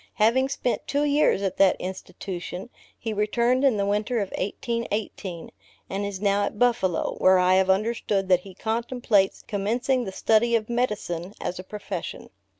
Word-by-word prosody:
Having 240 +5 +3
spent 250 -3 -2
two 285 +1 +1
years 290 -8 +3
at 195 - -2
that 195 -2 +5
Institution, 185 +2 -6 0.3
he 225 -1 -4
returned 235 +5 +1
in 265 -6 +4
the 200 - +1
winter 210 +4 0
of 200 -2 -2
1818, 205 -4 -3 0.4
and 195 +1 -2
is 200 -2 -4
now 200 0 +2
at 205 - -3
Buffalo; 230 -7 +1
where 185 0 +6
I 180 0 +4
have 190 0 +3
understood 200 -1 +1
that 180 -2 +5
he 185 0 -13
contemplates 225 -3 0
commencing 240 +6 0
the 190 - -4
study 225 +4 +3
of 225 0 -1
medicine, 205 -7 -2
as 180 - -4
a - - -6
profession. 200 -3 -6
205 Hz, 160 wpm, -25 LUFS, 190-235 Hz, 0.4 s, where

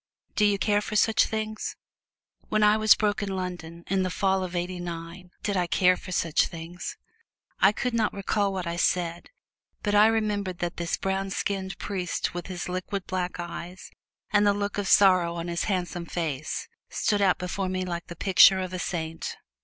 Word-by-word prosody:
Do 210 - +4
you 205 -1 +3
care 205 +1 +2
for 215 - -5
such 220 +1 +4
things?" 215 -1 -3 0.7
When 215 0 +2
I 210 0 +6
was 215 -1 +6
broke 210 -1 0
in 195 -2 -2
London, 175 -2 -5
in 190 0 0
the 185 - 0
Fall 190 0 +1
of 180 -1 -5
Eighty 180 +1 -2
nine! 170 +1 -7
Do 205 - 0
I 180 -2 +1
care 180 +2 +4
for 185 - -10
such 165 -3 +2
things? 170 +1 -7 0.6
I 195 - +6
can 240 +3 -2
not 220 -2 +2
recall 200 0 0
what 185 -2 -3
I 170 0 -3
said, 175 -1 0 0.5
but 205 - 0
I 210 +1 +7
remembered 210 -4 0
that 175 -1 -3
this 170 -1 -1
brown 195 0 -1
skinned 190 0 -3
priest 185 -4 -3
with 175 0 -5
his 180 -2 -5
liquid, 185 +1 -3
black 180 -1 -3
eyes, 175 +1 -7 0.4
and 205 0 +4
the 200 - +4
look 205 0 -2
of 200 - -2
sorrow 185 -4 +5
on 170 0 -4
his 170 0 -1
handsome 175 -3 -2
face, 155 -4 -3 0.2
stood 205 -2 0
out 190 -2 +4
before 185 +1 -3
me 185 0 -2
like 170 -1 -4
the 175 - -8
picture 190 +1 +6
of 185 -1 -4
a 185 - -3
saint. 165 -2 -4
185 Hz, 190 wpm, -27 LUFS, 175-205 Hz, 0.7 s, I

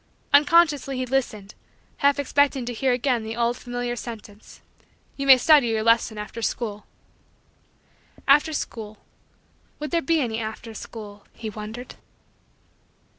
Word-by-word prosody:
Unconsciously 290 -2 +4
he 255 - -2
listened, 235 -6 -2 0.4
half 280 0 +3
expecting 285 -2 +1
to 245 - -4
hear 260 +3 0
again 245 -1 0
the 220 +1 -5
old 235 0 0
familiar 245 0 -4
sentence: 220 -3 -10 0.6
"You 275 0 -4
may 265 -1 +10
study 290 -1 +5
your 220 -1 0
lesson 230 -1 +2
after 210 +2 -7
school." 210 -3 -3 1.4
After 295 +3 +5
school 220 -7 -5 0.8
would 300 0 -6
there 340 -1 +1
be 325 +3 +1
any 230 -5 -2
after 220 +1 -6
school, 210 -2 -10
he 220 -2 -7
wondered. 220 +4 -8
240 Hz, 130 wpm, -24 LUFS, 220-275 Hz, 1.4 s, may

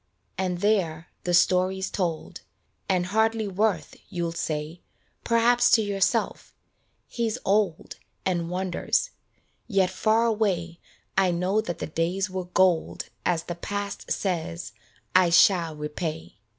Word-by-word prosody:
And 180 -1 -2
there 175 -6 +1 0.2
the 175 - 0
story's 185 +2 +2
told 170 -5 -3
j - - -20 0.5
And 180 -2 +2
hardly 220 +2 +1
worth, 195 -5 0
you'll 175 -3 -2
say 155 0 -4 0.4
Perhaps 240 +1 +4
to 220 - +6
yourself: 200 -2 -1 0.3
" - - -44
He's 230 -1 -2
old 195 -4 0 0.3
And 175 -3 0
wanders" 185 - -1 0.6
yet 195 -4 +2
far 220 +4 +2
away 185 -7 0 0.4
I 190 -1 +4
know 180 +5 +1
that 175 -6 -5
the - - -4
days 180 +5 -1
were 185 -1 -3
gold 180 -2 +1 0.2
As 170 -2 +1
the 175 - -5
past 200 +3 -5
says 175 -2 -2 0.2
" - - -34
I 185 -1 +6
shall 170 -2 +4
repay." 150 - -5
185 Hz, 135 wpm, -26 LUFS, 170-205 Hz, 0.6 s, to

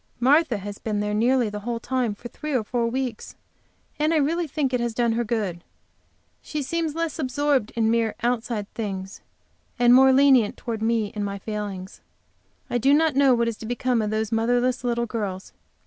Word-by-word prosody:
Martha 275 0 +3
has 205 +1 -7
been 210 -2 -2
there 210 0 -1
nearly 240 +3 +2
the 210 0 -5
whole 230 +2 -3
time 245 -3 -1
for 240 - -9
three 300 +3 -5
or 240 - +1
four 235 +1 -1
weeks, 250 -1 -4 0.6
and 310 +2 +2
I - - +4
really 325 +3 +1
think 270 -2 -1
it 250 - +2
has 235 -1 -2
done 235 -1 +2
her 235 +1 0
good. 205 -7 -2 0.8
She 300 -2 -4
seems 325 +1 -2
less 330 -1 -2
absorbed 275 -3 +1
in 225 -1 +2
mere 230 -1 +1
outside 235 -3 -1
things, 195 -3 -5 0.6
and 240 0 +5
more 265 +1 +7
lenient 265 -5 +4
toward 225 -3 -5
me 225 -2 0
and 210 - -3
my 200 0 -3
failings. 200 -2 -6 0.7
I 245 - -1
do 275 +4 +4
not 315 -2 +2
know 275 -2 +5
what 235 0 +1
is 230 -2 -3
to 220 - -8
become 245 0 0
of 210 - -1
those 215 0 -2
motherless 245 +3 +1
little 235 -1 0
girls. 205 -5 -5
235 Hz, 195 wpm, -24 LUFS, 215-265 Hz, 0.8 s, more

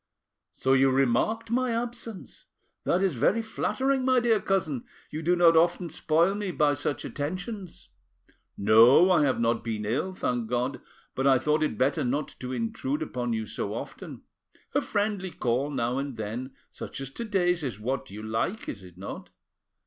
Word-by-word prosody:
"So 130 - +1
you 135 0 +5
remarked 135 - +1
my 255 +1 +1
absence! 230 -3 -5 0.4
That 180 +3 +2
is 190 -4 +2
very 205 - +2
flattering, 265 +4 0
my 255 -1 +4
dear 230 -3 +2
cousin; 160 -10 -1 0.3
you 155 - -4
do 175 +3 +2
not 170 -1 +6
often 170 +1 +3
spoil 165 +5 +2
me 205 -1 -3
by 150 -4 +2
such 145 +1 -3
attentions. 180 +5 -5 0.7
No, 115 - +6
I 175 - +5
have 140 -4 +2
not 115 0 +1
been 110 -2 -3
ill, 150 - -1
thank 120 -8 -1
God, 125 +3 -1 0.3
but 135 +1 0
I 135 -1 +6
thought 150 +4 +1
it 150 -8 0
better 135 +4 +1
not 140 +4 -1
to 125 0 -5
intrude 130 +5 -2
upon 125 -5 -3
you 110 -1 -2
so - - -4
often. - - -8 0.5
A - - +3
friendly 205 -2 -1
call 130 -2 -1
now 125 -2 -1
and 140 -3 -4
then 115 +5 -5 0.2
such - - -7
as 135 -1 -6
to 235 - -5
day's 180 -6 +1
is 125 -6 -4
what 130 +5 -3
you 105 +2 -8
like, 115 - -2
is 100 - -5
it 90 -2 -14
not? 95 - -7
145 Hz, 175 wpm, -27 LUFS, 120-190 Hz, 0.7 s, not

